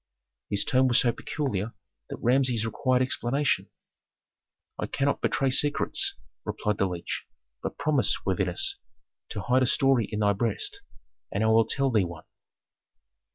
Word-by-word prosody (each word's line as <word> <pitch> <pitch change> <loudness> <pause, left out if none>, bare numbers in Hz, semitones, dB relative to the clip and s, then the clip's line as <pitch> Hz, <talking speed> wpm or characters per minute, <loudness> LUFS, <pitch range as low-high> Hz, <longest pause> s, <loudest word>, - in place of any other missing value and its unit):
His 100 -1 +1
tone 130 -1 +3
was 125 -1 +5
so 120 - +3
peculiar 115 -5 -3 0.4
that - - -5
Rameses 125 -2 +2
required 125 +3 +1
explanation. 130 +2 0 1.1
"I - - -2
cannot 140 0 -1
betray 135 -1 +1
secrets," 145 +3 +2 0.3
replied 105 0 -2
the 95 - +2
leech; 90 -2 -5 0.3
"but - - -5
promise, 145 -1 +1
worthiness, 390 +1 0 0.5
to - - -4
hide 125 +2 +2
a 130 - +3
story 135 -4 +3
in 105 -1 -2
thy 100 -1 +3
breast, 110 +1 -2 0.5
and 100 - -1
I - - +3
will 110 0 +5
tell 135 +1 +1
thee 110 -4 +3
one." 85 -2 -7
125 Hz, 145 wpm, -27 LUFS, 105-135 Hz, 1.1 s, was